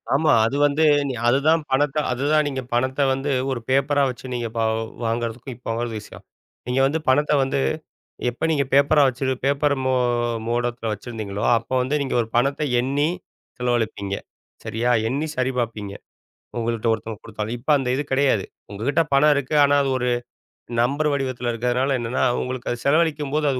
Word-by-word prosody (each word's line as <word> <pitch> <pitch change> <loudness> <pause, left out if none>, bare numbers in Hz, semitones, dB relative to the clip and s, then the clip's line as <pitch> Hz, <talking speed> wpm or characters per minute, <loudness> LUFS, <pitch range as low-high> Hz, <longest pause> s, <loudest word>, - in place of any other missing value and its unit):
ஆமா, 150 +2 +3
அது 115 - -1
வந்து 145 +2 +2 0.2
நீ 135 - -2
அதுதான் 145 +6 +3
பணத்த 145 +2 +1
அதுதான் 145 +4 +2
நீங்கப் 130 -3 -5
பணத்த 130 +3 0
வந்து 135 +2 -2 0.2
ஒரு 130 - -2
பேப்பரா 140 +2 +2
வச்சு 125 0 -8
நீங்க 120 -1 -2
வா 115 - +2 0.4
வாங்குறதுக்கும் 115 +2 -3
இப்போ 125 - -13
வாங்கும் 115 0 -3
விஷயம். 105 - -13 0.4
நீங்க 125 +2 0
வந்து, 150 +4 0
பணத்த 145 +3 +3
வந்து, 135 +1 -1 0.7
எப்ப 120 +6 -3
நீங்க 145 -3 +2
பேப்பரா 140 +2 +5
வச்சு 130 +1 -1
பேப்பர் 140 +1 +2
மோ 130 - +2 0.5
மோடத்துல 120 -1 -1
வச்சுருந்தீங்களோ, 105 -2 -6
அப்ப 115 - -8
வந்து, 130 +4 -1
நீங்க 135 - -2
ஒரு 115 - -4
பணத்த 140 +4 +1 0.2
எண்ணி 140 +5 +1 0.5
செலவழிப்பீங்க. 110 -5 -1 0.5
சரியா? 115 +2 -1 0.2
எண்ணி 140 +6 -1
சரி 130 +1 0
பாப்பீங்க. 110 -4 -3 0.7
உங்கள்ட 115 -1 -2
ஒருத்தங்க 110 -1 -4
கொடுத்தாலும், 110 +1 -4
இப்ப 125 +6 -4
அந்த 135 -2 -2
இது 145 - 0
கடையாது. 130 -8 +2 0.3
உங்ககிட்ட 125 +11 +1
பணம் 150 +2 +5
இருக்கு, 140 +1 -2
ஆனா 145 0 +3
அது 135 - -1
ஒரு 125 0 0 0.7
நம்பர் 145 +5 +1
வடிவத்துல 130 -3 -2
இருக்குறனால 125 +3 0
என்னன்னா, 120 +2 -1 0.2
உங்களுக்கு 125 -1 -4
அதச் 120 0 -5
செலவழிக்கும்போது, 150 -1 +1
அது 130 - -2
130 Hz, 160 wpm, -22 LUFS, 120-140 Hz, 0.7 s, பேப்பரா